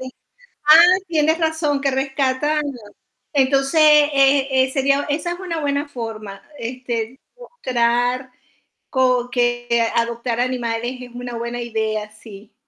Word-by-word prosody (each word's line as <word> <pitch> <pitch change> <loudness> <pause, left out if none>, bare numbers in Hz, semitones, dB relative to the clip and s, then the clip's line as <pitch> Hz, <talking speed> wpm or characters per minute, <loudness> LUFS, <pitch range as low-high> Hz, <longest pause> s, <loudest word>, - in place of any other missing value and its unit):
Sí, 260 0 -8 0.8
ah, - - +6 0.2
tienes 320 -1 +1
razón, 320 -3 0
que 275 0 0
rescatan. 270 +2 0 0.7
Entonces, 275 +2 +2
e 275 -3 +4
eh 260 - -4
sería 275 0 +1
esa 325 +4 -2
es 350 - -7
una 340 -4 -4
buena 285 0 -1
forma, 220 -6 -8 0.2
este, 240 0 -5 0.2
mostrar 250 - -1 0.6
co 255 -2 +1
que 240 -1 0
adoptar 235 0 -1
animales 245 -1 -2
es 245 - -10
una 245 0 -7
buena 235 +1 -4
idea, 220 -2 -3
sí. 215 0 -14
255 Hz, 125 wpm, -20 LUFS, 235-285 Hz, 0.8 s, ah